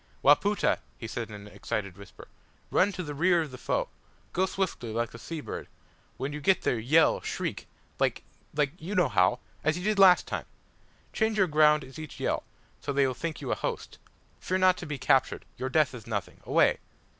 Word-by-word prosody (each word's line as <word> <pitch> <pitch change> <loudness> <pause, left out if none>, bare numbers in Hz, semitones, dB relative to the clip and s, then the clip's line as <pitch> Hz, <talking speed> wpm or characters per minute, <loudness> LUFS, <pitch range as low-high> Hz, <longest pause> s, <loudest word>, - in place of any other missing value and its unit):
"Wapoota!" 200 +9 +4 0.2
he - - -8
said 115 0 -4
in 105 - -8
an 105 0 -10
excited 105 -3 -4
whisper, 100 -1 -13 0.4
"run 205 - +3
to 185 -1 -5
the 150 -3 -5
rear 170 +3 +3
of 150 - -9
the 130 - -8
foe. - - -1 0.5
Go 190 +1 +2
swiftly, 185 - -3
like 115 +1 -1
the 115 - -11
sea 160 +5 -6
bird. - - -6 0.5
When 140 +2 -3
you 150 - -5
get 185 +6 +3
there, 120 - +1
yell, 150 +9 +4
shriek - - -4 0.3
like - - +1 0.3
like 145 -2 +2
you 185 +6 -5
know 175 -8 +3
how! 95 +2 +3 0.3
As 155 +2 +1
you 180 - -5
did 210 0 +1
last 185 -2 +7
time! - - -4 0.7
Change 220 -1 +1
your 190 - +5
ground 150 -2 +4
at 135 +3 -11
each 155 -2 -8
yell - - 0 0.4
so - - -3
they 140 0 +3
will 130 - 0
think 160 +3 -5
you 135 - -3
a - - +2
host. - - -5 0.4
Fear 185 - -1
not 185 -1 +5
to 175 - -7
be 150 -1 -3
captured. 135 0 +2
Your 130 +1 -3
death 150 -1 +2
is 115 -4 -10
nothing. 105 -4 -4
Away!" - - +4
150 Hz, 205 wpm, -28 LUFS, 120-180 Hz, 0.7 s, last